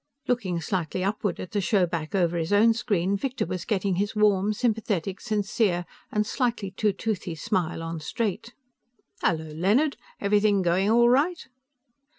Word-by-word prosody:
Looking 200 -9 0
slightly 180 +1 -2
upward 200 -1 -1
at 185 - -7
the 210 - 0
showback 175 -3 0
over 175 -3 +2
his 165 +1 -2
own 220 +3 +5
screen, 200 -5 0
Victor 255 +5 -2
was 180 -2 -4
getting 195 -3 0
his 205 +3 -1
warm, 210 -1 +3
sympathetic, 210 -5 -1
sincere 205 -4 0 0.3
and 210 0 +1
slightly 235 -6 -1
too 210 +2 +1
toothy 195 -5 -3
smile 175 -2 -2
on 165 0 -4
straight. 230 +7 -3 0.7
"Hello, 160 -2 0
Leonard. 215 - +2 0.2
Everything 205 -1 +3
going 180 +3 +2
all 235 +1 +5
right?" 295 +8 +2
200 Hz, 150 wpm, -26 LUFS, 180-220 Hz, 0.7 s, own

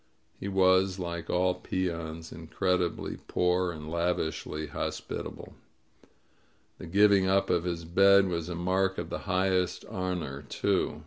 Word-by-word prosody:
He - - -5
was, 95 0 +3
like 85 -2 -5
all 90 +1 +2
peons, 85 -3 -4
incredi 90 +2 0
bly - - -6
poor 90 0 +1
and 75 -2 -8
lavishly 80 -2 -2
hospitable. 75 - -5 1.3
The - - -8
giving 100 +1 +4
up 95 0 +2
of 90 -1 +1
his 85 -2 -3
bed 100 +3 +5
was 85 -2 -3
a 90 - -3
mark 95 +2 0
of 85 0 -5
the - - -3
highest 90 -1 +1
honor, 90 -7 -4
too. 75 - 0
90 Hz, 135 wpm, -29 LUFS, 85-95 Hz, 1.3 s, bed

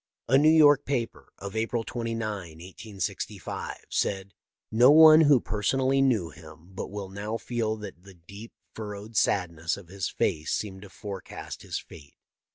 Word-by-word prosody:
A 130 - +3
New 150 +3 +6
York 145 -3 +6
paper, 125 -4 -4
of 100 +1 -8
April 115 +1 -1
29, 115 -1 -4
1865, 95 0 -6
said: 95 -1 -1 0.4
"No 120 +4 +6
one 155 +1 +9
who 145 -4 +5
personally 130 +6 0
knew 110 - +1
him 80 +2 -15
but 95 - -6
will 100 -1 -6
now 105 +3 -4
feel 115 -2 -2
that 105 -5 -10
the 95 0 -15
deep, 100 +7 -12 0.2
furrowed 105 0 -8
sad 90 -3 +2
ness 85 0 -3
of 95 -4 -13
his 95 -1 -3
face 80 0 -1
seemed 95 -3 -3
to 100 - -12
forecast 95 +1 -8
his - - -4
fate. 70 -3 -12
105 Hz, 160 wpm, -27 LUFS, 95-120 Hz, 0.4 s, one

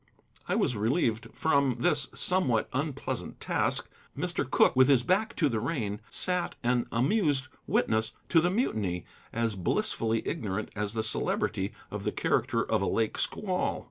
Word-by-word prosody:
I - - +1
was 125 - +1
relieved 115 +1 +1
from 140 -5 +2
this 145 +3 +2
somewhat 140 -12 +1
unpleasant 140 +1 -3
task. - - 0 0.3
Mr. - - -2
Cooke, - - +4
with 130 0 +6
his 135 -4 +5
back 210 - +1
to 155 - +3
the 115 -5 0
rain, 105 -7 -2
sat 180 +5 -1
an 120 0 +1
amused 145 - +2 0.2
witness 110 0 +1 0.2
to 165 - +5
the 175 - +2
mutiny, 105 - -1 0.3
as 115 -1 0
blissfully 110 +4 0
ignorant 105 0 -2
as 105 +1 -2
the 110 - 0
Celebrity 110 - -1 0.2
of - - -4
the - - 0
character - - +1
of - - 0
a - - 0
lake 110 -1 0
squall. 185 -3 -1
125 Hz, 155 wpm, -29 LUFS, 110-160 Hz, 0.3 s, with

